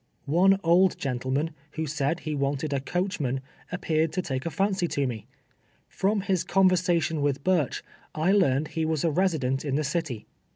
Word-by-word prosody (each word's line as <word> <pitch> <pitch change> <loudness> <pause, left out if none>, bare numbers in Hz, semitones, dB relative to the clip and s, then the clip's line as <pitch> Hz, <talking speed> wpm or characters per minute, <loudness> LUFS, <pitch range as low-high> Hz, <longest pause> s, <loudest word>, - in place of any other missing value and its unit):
One 185 +6 +4
old 175 +2 +4
gentleman, 135 +4 -1 0.2
who 160 - -2
said 150 +2 -1
he 155 - -3
wanted 140 +1 -1
a 140 - +1
coach 180 +8 -2
man, 135 -2 -1 0.3
appeared 160 -3 0
to 185 - -1
take 135 -1 -3
a - - 0
fancy 195 0 0
to 140 -3 -1
me. 120 -4 -5 0.6
From 200 +1 0
his 190 -3 0
con 190 +1 +4
versation 170 -4 +1
with 140 -1 0
Burch, 175 -7 +1 0.3
I 160 +5 +2
learned 155 -7 +2
he 160 - -2
was 160 -2 0
a 165 - +2
resident 150 -7 0
in 140 -3 -1
the 155 - +1
city. 145 -7 -3
160 Hz, 180 wpm, -26 LUFS, 140-180 Hz, 0.6 s, One